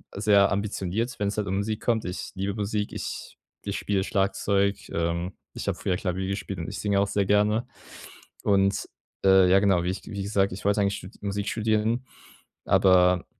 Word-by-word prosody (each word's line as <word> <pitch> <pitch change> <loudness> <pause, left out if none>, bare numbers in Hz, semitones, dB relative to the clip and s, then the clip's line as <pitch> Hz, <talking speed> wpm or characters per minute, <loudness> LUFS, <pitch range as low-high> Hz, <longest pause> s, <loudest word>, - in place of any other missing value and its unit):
sehr 100 -1 +4
ambitioniert, 100 +3 -2
wenn 100 - 0
es 105 - -5
halt 105 -1 -1
um 95 +1 -1
Musik 105 +2 -2
kommt. 115 -2 0
Ich 90 +1 -5
liebe 100 +1 -2
Musik. 105 0 -2
Ich - - -6 0.3
ich - - -2
spiele 100 -2 0
Schlagzeug, 100 0 +1
ähm. 85 +2 -1 0.2
Ich - - -6
habe - - 0
früher 90 - -1
Klavier 95 -1 -2
gespielt 100 -1 -4
und 80 - -4
ich 95 -3 -6
singe 100 +1 +1
auch 100 - +2
sehr 100 0 0
gerne. 105 +4 +2 0.8
Und, 100 -1 +2 0.4
äh, 95 -1 +6
ja 95 +1 +6
genau, 95 -3 +3
wie 90 - -1
ich 95 - -7
wie 100 -2 -5
gesagt, 100 -1 +1
ich 95 - -8
wollte 100 +1 +2
eigentlich 100 0 +1
stu - - -9
Musik 100 0 -3
studieren, 110 +3 0 0.6
aber, 90 -1 +4
100 Hz, 190 wpm, -26 LUFS, 95-105 Hz, 0.8 s, äh